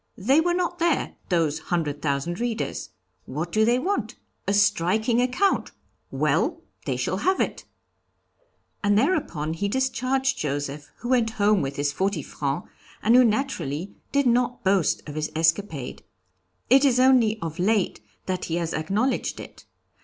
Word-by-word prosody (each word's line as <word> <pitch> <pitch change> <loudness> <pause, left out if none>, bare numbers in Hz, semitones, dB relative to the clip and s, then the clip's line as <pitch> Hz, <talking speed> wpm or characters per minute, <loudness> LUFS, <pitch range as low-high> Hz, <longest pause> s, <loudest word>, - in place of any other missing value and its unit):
They 270 +9 +3
were 350 +1 +1
not 355 0 -1
there, 335 -2 +1 0.2
those 160 -4 +1
hundred 155 -5 -2
thousand 145 +4 -1
readers. 235 -2 -3 0.4
What 155 +6 -4
do 215 +3 +3
they 240 +2 +3
want? 380 +10 -2 0.3
A 200 - +2
striking 215 +4 +2
account 255 +11 +1 0.4
well! - - 0 0.2
they - - 0
shall - - -1
have 375 0 +1
it!' - - -2 1.2
And 205 0 +3
thereupon 225 - 0
he 200 +5 -2
discharged 265 +2 0
Joseph, 145 0 -3
who 240 - -4
went 240 -3 +3
home 205 -1 +3
with 135 0 -3
his 145 0 0
forty 190 0 -1
francs, 140 +4 -3 0.4
and 230 +3 +5
who 255 - +8
naturally 200 - -1 0.2
did 280 0 +2
not 245 0 +1
boast 190 -6 +1
of 145 - -6
his 155 0 -3
escapade. 160 -4 0 0.7
It 265 +3 +6
is 255 -3 +4
only 250 -4 +4
of 165 -1 -5
late 195 - +1 0.2
that 185 -1 -2
he 165 - -2
has 170 -1 -2
acknowledged 205 +12 -1
it. - - -11
205 Hz, 155 wpm, -25 LUFS, 160-255 Hz, 1.2 s, who